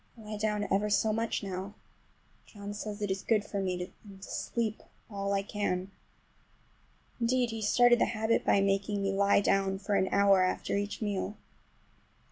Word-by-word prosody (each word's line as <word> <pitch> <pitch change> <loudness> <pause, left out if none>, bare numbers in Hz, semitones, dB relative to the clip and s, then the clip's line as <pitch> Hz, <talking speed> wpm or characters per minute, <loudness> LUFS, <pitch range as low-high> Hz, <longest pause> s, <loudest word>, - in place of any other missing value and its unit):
I - - -12
lie 215 0 -6
down 210 -1 0
ever 205 +2 +2
so 215 +1 +2
much 225 0 -1
now. 195 +1 -5 0.7
John 205 -1 -8
says 210 0 -5
it 205 - -1
is 190 0 -2
good 215 -3 +1
for 200 - -3
me, 180 -1 -3
and 200 -2 -13
to 195 - -10
sleep 225 -2 -2 0.3
all 200 0 -2
I 195 0 +1
can. 195 -2 -2 1.3
Indeed, 245 0 +1
he 225 0 -5
started 240 +3 +5
the - - +4
habit 220 0 0
by 200 - +3
making 195 +1 0
me 195 - +1
lie 200 +1 +3
down 195 -1 +1
for 200 +1 -3
an 190 -1 +2
hour 200 -1 +5
after 185 +1 0
each 205 +2 -2
meal. 205 0 -2
205 Hz, 175 wpm, -30 LUFS, 195-215 Hz, 1.3 s, started